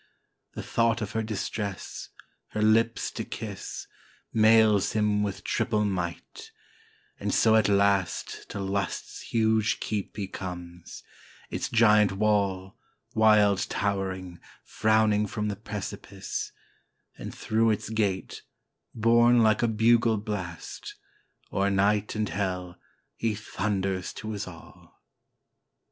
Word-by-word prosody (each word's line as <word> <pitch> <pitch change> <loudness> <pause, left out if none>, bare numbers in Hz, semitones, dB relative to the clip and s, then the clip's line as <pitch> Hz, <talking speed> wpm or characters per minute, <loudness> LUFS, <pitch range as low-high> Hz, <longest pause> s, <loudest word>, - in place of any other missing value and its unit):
The - - -6
thought 115 0 +1
of 105 - -5
her 110 - -1
distress, 105 -2 -4 0.4
her 110 - -1
lips 115 +2 +2
to - - -4
kiss, - - -6 0.5
Mails 110 -2 +5
him 105 -1 +2
with 100 -2 -3
triple 105 0 0
might; 90 -4 -4 0.7
and - - -2
so 110 -1 +4
at 110 -2 +4
last 100 -2 +1
To 100 - -5
Lust's 100 -1 -3
huge 110 -1 +1
keep 105 -2 -4
he 100 -2 -3
comes; 90 -2 -8 0.5
its - - -2
giant 105 -3 +5
wall, 100 -2 0 0.3
Wild 105 -3 +5
towering, 95 -3 -2 0.2
frowning 110 -1 +2
from 105 +1 -2
the 100 - -2
precipice; 100 -1 -6 0.6
And - - -7
through 115 +1 +1
its 110 0 -1
gate, 100 -4 -1 0.5
borne 120 +1 +5
like 110 -1 +3
a 120 - +3
bugle 115 0 +3
blast, 100 -5 -6 0.6
O'er 100 +1 +2
night 100 +2 +1
and 110 0 0
hell 90 -3 -3 0.4
he 115 -2 -1
thunders 95 -2 -2
to 110 - -6
his 105 -2 -4
all. 85 -2 -14
105 Hz, 120 wpm, -27 LUFS, 95-110 Hz, 0.7 s, Mails